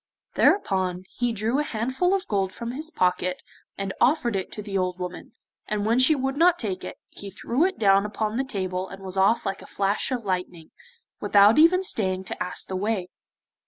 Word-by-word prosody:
Thereupon 185 - +2
he 245 -1 -1
drew 225 +5 0
a - - +1
handful 260 - 0
of 385 - -3
gold 195 -2 0
from 235 +3 -6
his 305 +5 -6
pocket, 180 - 0 0.3
and 195 -1 -3
offered 245 -5 +3
it 190 -1 -3
to 210 - -6
the 200 -1 -6
old 185 -1 0
woman, 180 -1 -7 0.3
and 210 -1 -2
when 230 +3 +2
she 280 +5 +5
would 270 0 -2
not 345 +3 +4
take 195 - -3
it, - - -7
he 200 - -9
threw 235 - 0
it 380 0 -1
down 195 -2 +4
upon 210 +1 -3
the 265 - 0
table 185 -6 -3
and 195 0 -10
was 190 0 -5
off 195 +5 +3
like 195 0 -3
a - - -12
flash 200 +5 -1
of 245 -4 -3
lightning, 180 -3 -4 0.5
without 205 +5 +5
even 365 +4 +5
staying 190 - -1
to - - -4
ask 180 - -3
the 190 - -5
way. 190 -2 -2
205 Hz, 200 wpm, -25 LUFS, 190-255 Hz, 0.5 s, she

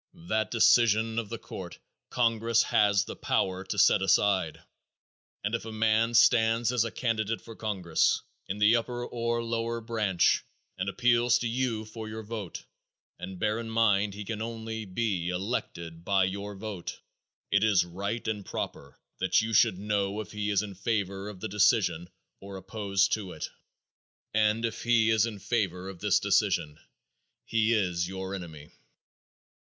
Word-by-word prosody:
That 110 +3 0
decision 115 0 +4
of 110 -3 -5
the - - -4
court - - -8 0.3
congress 115 -1 +2
has 100 -1 +3
the - - -7
power 95 0 -1
to 105 - -4
set 95 - +5
aside, 95 -3 +2 0.8
and 105 +2 -2
if 115 - -1
a 115 - -6
man 110 +1 +2
stands 115 0 +4
as 125 -3 +2
a 115 - -2
candidate 115 -2 -1
for 115 - -12
congress, 95 -7 0 0.2
in 100 - -3
the 105 +3 +5
upper 120 +1 -3
or 115 0 -2
lower 115 0 -2
branch, 110 -6 +1 0.3
and 95 +1 -2
appeals 120 +2 +3
to 120 - -2
you 115 -2 -1
for 110 0 -8
your 110 +1 -6
vote 105 -4 -6 0.6
and 95 +1 -7
bear 105 +4 0
in 115 -1 -6
mind 105 -3 +2
he 105 0 -7
can 110 +1 -4
only 110 -1 -5
be 95 -3 -1
elected 90 -4 -4
by 95 +1 +2
your 100 +2 -3
vote 100 -3 -6 0.5
it 100 +1 +3
is 105 -5 +4
right 100 +7 -4
and 105 -2 -2
proper 70 -6 -6 0.2
that - - +3
you 115 +1 -3
should 95 - +4
know 100 0 -1
if 110 - -6
he 105 0 -3
is 100 0 +2
in 100 -2 -7
favor 100 -1 -2
of 95 -3 -10
the - - -2
decision 105 -4 +2 0.3
or 100 0 -9
opposed 100 0 0
to 100 -4 -3
it. - - -6 0.8
And 110 +1 +2
if 115 - -4
he 115 -2 +3
is 110 0 +3
in 110 -3 -6
favor 100 -4 -2
of 95 -2 -8
this - - +3
decision 75 0 +1 0.7
he 115 0 +2
is 90 -4 0
your 95 0 -5
enemy. 80 -6 -8
105 Hz, 165 wpm, -28 LUFS, 95-115 Hz, 0.8 s, set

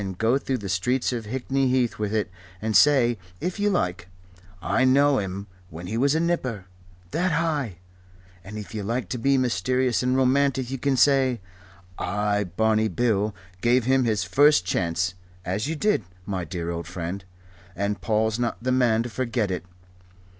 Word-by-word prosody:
And 95 -2 -5
go 115 +6 +2
through 135 -2 -2
the 105 -4 -6
streets 120 +8 0
of 115 -3 -4
Hickney 130 +3 0
Heath 125 -3 +1
with 105 -1 -1
it, 105 -4 -1 0.3
and 110 0 -2
say 120 -6 +5 0.2
if 180 - -3
you 205 0 +2
like: 90 - -1 0.5
'I 105 +8 +1
knew 140 +1 +4
him 95 0 -4 0.2
when' 80 +3 -8
he 105 +5 -4
was 140 +5 +2
a - - +2
nipper 130 - -1 0.5
that 180 +1 0
high.' 150 - -1 0.7
And 105 +3 -8
if 105 +1 -8
you 110 - -3
like 115 0 -2
to 125 - -3
be 135 +3 +3
mysterious 125 +1 +1
and 125 +1 +1
romantic 130 -1 +2
you 135 - -3
can 140 -1 +1
say: 130 -2 +4 0.6
'I, 105 +1 0
Barney 110 +5 +1
Bill, 110 -3 0 0.3
gave 120 +1 +3
him 130 0 +3
his 110 -4 +1
first 140 - +4
chance,' 85 0 0 0.3
as 100 +7 -2
you 160 - -2
did, 205 - +1 0.2
my 95 -3 -3
dear 85 +1 -4
old 85 -1 -5
friend, 90 +2 -5 0.5
and 100 +3 -2
Paul's 110 0 0
not 120 -1 -1
the 130 +2 -1
man 120 -3 +3
to 120 - -5
forget 115 -2 -1
it. 90 - -3
115 Hz, 175 wpm, -25 LUFS, 100-130 Hz, 0.7 s, say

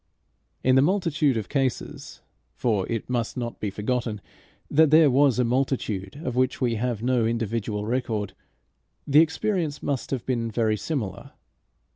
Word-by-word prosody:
In 130 - +4
the 130 - +6
multitude 155 - +2
of 110 - -3
cases 135 -3 -3 0.3
for 105 -5 0
it 115 -2 -2
must 120 -1 -2
not 120 -1 -4
be 105 - -2
forgotten 110 +2 -2 0.5
that 155 +1 +4
there 155 -1 +6
was 135 -1 +4
a 125 - +3
multitude 120 -4 -1
of 125 - -3
which 130 +1 +1
we 125 -3 +1
have 115 -1 -2
no 125 -1 +2
individual 110 -2 -2
record 110 -5 -2 0.7
the 145 +2 +5
experience 165 -1 -1
must 140 -3 -2
have 130 -4 -3
been 120 -3 -1
very 110 -1 +1
similar. 110 - -4
125 Hz, 150 wpm, -25 LUFS, 110-140 Hz, 0.7 s, the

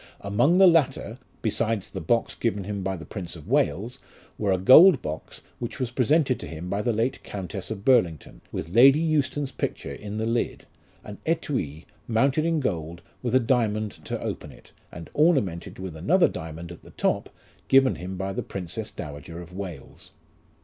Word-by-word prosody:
Among 105 - +2
the 190 - +8
latter 135 - +2 0.2
(besides 110 -2 0
the - - -5
box 120 -2 +1
given 105 -4 -1
him 100 0 -4
by 95 0 -2
the 85 - -9
Prince 90 -5 -7
of 80 -3 -12
Wales) 110 - 0 0.4
were 100 -2 0
a 95 - +3
gold 140 - +8
box, 75 +1 -6 0.2
which 120 +2 -5
was 125 -2 -2
presented 130 +2 +2
to - - -7
him 80 +2 -7
by 100 - 0
the 120 - +1
late 115 +4 -1
Countess 95 -5 -6
of 105 -3 -6
Burlington, 90 - +2
with 80 - -5
Lady 135 +5 +8
Euston's 145 -3 0
picture 70 - -4
in 105 +7 -7
the 110 - -1
lid, 115 +1 -1 0.4
an 105 -1 -9
6tui, 130 - -2 0.2
mounted 135 +7 +2
in 165 -1 +1
gold, 85 - -3 0.2
with 125 0 -1
a - - +7
diamond 110 -4 +1
to - - -3
open - - -5
it, - - -18 0.2
and 85 -1 -10
ornamented 135 - +1
with 95 -3 -6
another 170 - +3
diamond 80 +2 -7
at 85 - -11
the - - -15
top, - - -1 0.4
given 135 -1 +5
him 90 +1 -6
by 95 +1 -3
the - - -2
Princess 95 +4 -5
Dowager 75 +3 -8
of 90 0 -11
Wales. 90 -7 -8
105 Hz, 180 wpm, -25 LUFS, 90-130 Hz, 0.4 s, the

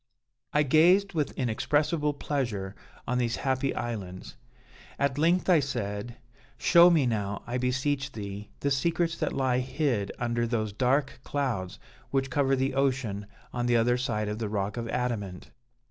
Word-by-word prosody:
"I 150 - +3
gazed 180 +8 +4
with 155 -4 0
inexpressible 145 +5 0
pleasure 115 -11 -2 0.3
on 125 +1 0
these 120 -1 0
happy 135 0 -1
islands. 95 -6 -5 0.6
At 140 0 0
length, 170 +4 +3
I 180 -4 +6
said: 110 -4 -3 0.4
'Show 175 0 +7
me 160 -6 +4
now, 105 -4 -2
I 125 +1 -2
beseech 135 +2 0
thee, 100 -1 -7
the 140 - 0
secrets 170 +4 +1
that 155 - 0
lie 130 -2 +1
hid 130 -5 -1
under 120 -1 0
those 110 -3 -1
dark 130 +5 +1
clouds 120 -11 -2 0.3
which 135 -1 0
cover 135 -1 +2
the 135 +1 0
ocean 130 -7 0 0.3
on 120 -1 -1
the 120 -1 +4
other 120 +2 +3
side 115 -4 -1
of 105 +1 -3
the 110 -2 -2
rock 100 0 -2
of 115 -1 -4
adamant.' 110 -8 -3
125 Hz, 155 wpm, -28 LUFS, 110-140 Hz, 0.6 s, Show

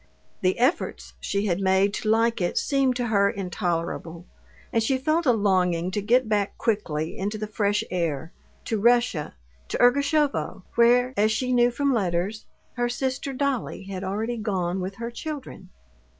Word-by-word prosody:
The 185 0 +1
efforts 255 +8 0
she 200 +1 -1
had 180 -3 0
made 190 +1 +3
to 215 - -2
like 230 0 +2
it 175 - -1
seemed 270 -3 +2
to 245 -2 -2
her 200 -2 +3
intolerable, 170 -3 -3 0.5
and 230 - +3
she 260 +4 +1
felt 310 +4 0
a - - +7
longing 185 -5 +1
to 205 - -1
get 240 +4 +3
back 205 -2 0
quickly 165 -9 -1
into 205 +3 -3
the 215 - -3
fresh 210 0 0
air, 165 -3 -2 0.3
to 220 -3 -1
Russia, 235 - +2 0.3
to - - -3
Ergushovo, 280 -4 +2
where, 245 +2 +4
as 215 0 +3
she 255 +3 0
knew 240 0 +5
from 275 +3 0
letters, 195 0 -1 0.3
her 240 -1 -1
sister 265 +2 -2
Dolly 265 -7 -2
had 190 -1 -6
already 220 +5 -2
gone 190 -4 -1
with 190 +2 -4
her 235 +2 -5
children. 270 -8 -7
215 Hz, 165 wpm, -25 LUFS, 190-245 Hz, 0.5 s, a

